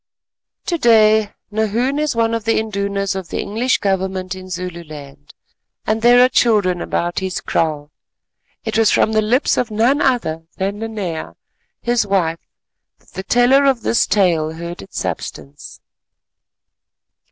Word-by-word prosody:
To 340 -2 -1
day 220 -4 +4 0.2
Nahoon 225 +6 0
is 300 -4 -1
one 230 0 +1
of 230 -1 -2
the 225 +1 +1
Indunas 200 -2 -2
of 190 -3 -5
the - - -3
English 235 +5 0
Government 190 -1 -2
in 185 0 -10
Zululand, 160 - -8 0.5
and 220 +1 0
there 245 +1 +6
are - - +4
children 210 -8 +2
about 175 0 -2
his 190 -1 -3
kraal. 150 -2 -2 0.7
It 220 0 -1
was 225 - +4
from - - +2
the 215 0 +2
lips 240 +6 +1
of 245 - 0
none 235 +7 +2
other 165 -12 0
than 200 +2 -2
Nanea 205 -8 -5 0.5
his 240 -3 +1
wife 170 -4 0 0.6
that - - -27
the 190 - -5
teller 245 +7 +3
of 260 -5 +2
this 230 - +2
tale 165 -6 +1
heard 170 +1 -7
its 95 - -11
substance. 70 -2 -6
205 Hz, 145 wpm, -18 LUFS, 180-230 Hz, 0.7 s, there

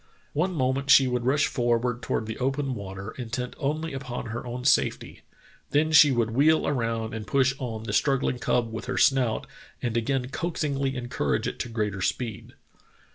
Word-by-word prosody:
One 180 +5 0
moment 135 -1 0
she 135 -1 +7
would 125 -1 -1
rush 140 +2 +3
forward 120 0 0
toward 110 - -2
the 110 0 -6
open 135 +1 -1
water, 100 -1 -7
intent 125 +1 -4
only 155 +2 -2
upon 130 -2 -5
her 120 +2 -5
own 125 +1 -5
safety; - - +1 0.5
then 150 +3 +2
she 150 -2 +8
would 115 -3 +1
wheel 150 +6 +3
around 115 -4 -1
and 110 -2 -6
push 135 +4 +3
on 115 -4 -4
the 115 - -4
struggling 135 -3 +1
cub 115 -2 0
with 110 +1 -5
her - - -3
snout 130 -5 +3 0.3
and 120 -2 -2
again 125 +2 0
coaxingly 140 -4 -2
encourage 120 - -1
it - - -5
to - - -3
greater 105 -4 -2
speed. 115 +2 -3
125 Hz, 175 wpm, -26 LUFS, 115-140 Hz, 0.5 s, she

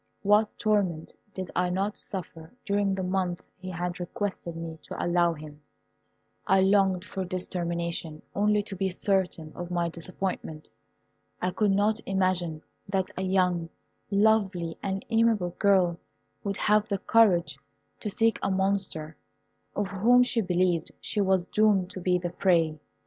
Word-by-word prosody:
What 210 +1 +3
torment 195 -7 0 0.2
did 185 -2 -6
I 180 0 +2
not 195 +3 -1
suffer 165 -4 -6
during 200 -1 +1
the 190 - -3
month 180 -1 -1
he 185 0 -8
had 175 0 -3
requested 180 -2 -4
me 165 -1 -6
to - - -5
allow 175 0 +3
him. 150 -1 -11 0.9
I 190 0 +5
longed 190 -1 +3
for 195 -2 -5
its 185 0 -3
termination 170 -3 -3
only 210 0 +2
to 200 -2 -6
be 190 0 0
certain 180 -4 -1
of 175 0 -6
my 175 -1 0
disappointment. 170 -2 -5 0.7
I 180 - 0
could 210 +3 +1
not 205 +3 +2
imagine 185 -4 0 0.3
that 190 -1 0
a - - -3
young, 180 -3 +1 0.4
lovely, 200 -5 +2
and 195 0 -3
amiable 225 -5 +3
girl 185 -4 +3 0.4
would 200 -1 -2
have 210 +1 +3
the 200 - 0
courage 195 -5 +3 0.4
to 210 - -3
seek 225 +2 +1
a - - 0
monster, 190 -5 -1 0.6
of 205 - 0
whom 235 +6 +5
she 245 -2 +1
believed 180 -3 +1
she 210 - -1
was 190 -2 +2
doomed 200 -3 +2
to 195 - -6
be 180 0 +2
the 175 -1 -4
prey. 165 -4 +2
185 Hz, 150 wpm, -27 LUFS, 175-200 Hz, 0.9 s, I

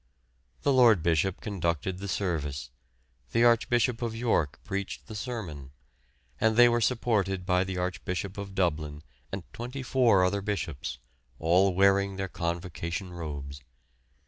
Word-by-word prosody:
The 140 - +3
Lord 115 -9 +6
Bishop 85 +3 +1
conducted 90 - -2
the 100 - -5
service, 75 -10 -2 0.6
the 115 - +4
Archbishop 120 0 +3
of 115 -2 -2
York 110 - 0
preached 100 0 -4
the - - -9
sermon, 90 - -6 0.7
and 110 0 +3
they 120 0 +9
were 120 0 +2
supported 105 -6 +1
by 90 -1 +3
the 95 -1 -4
Archbishop 90 +1 -3
of 100 -1 -7
Dublin 75 -5 -1 0.3
and 95 -2 -4
twenty 125 +3 -5
four 120 -8 +4
other 100 +2 +1
bishops, 90 -10 -3 0.4
all 90 +4 +3
wearing 100 +1 +3
their 95 0 -3
convocation 85 +1 -4
robes. 70 -4 -6
95 Hz, 135 wpm, -28 LUFS, 85-110 Hz, 0.7 s, they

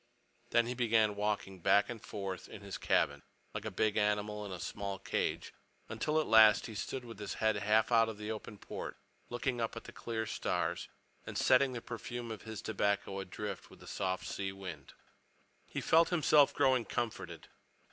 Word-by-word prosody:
Then 120 0 +4
he 120 - -2
began 110 -4 +3
walking 105 -2 -2
back 100 +4 +4
and 115 -3 -6
forth 100 -4 -5
in 105 - -9
his 100 -2 -6
cabin, 70 0 +2 0.3
like 105 0 -5
a - - -1
big 105 +2 +1
animal 105 0 +1
in 100 - -6
a 90 - -5
small 100 +2 -4
cage, - - -2 0.4
until 150 +8 0
at 155 - +1
last 110 0 +7
he 115 - -7
stood 125 +4 -4
with 115 -3 -9
his 105 -2 -4
head 110 -1 +2
half 110 +3 +3
out 115 -1 +5
of 110 - -6
the 105 +1 -4
open 110 -1 -6
port, - - -6 0.3
looking 120 0 -1
at 115 - -1
the - - -10
clear 110 -1 -3
stars - - -1 0.4
and - - -4
setting 130 0 +4
the 120 - -4
perfume 120 +1 -6
of 110 - -6
his 110 -2 -7
tobacco 100 -2 0
adrift 100 +1 -5
with - - -15
the - - -13
soft 95 -1 -2
sea 95 -1 -3
wind. 90 -7 -8 0.7
He - - -4
felt 165 +1 +5
himself 150 -4 +5
growing 130 -3 +3
comforted. 90 -8 -4
105 Hz, 185 wpm, -34 LUFS, 100-115 Hz, 0.7 s, last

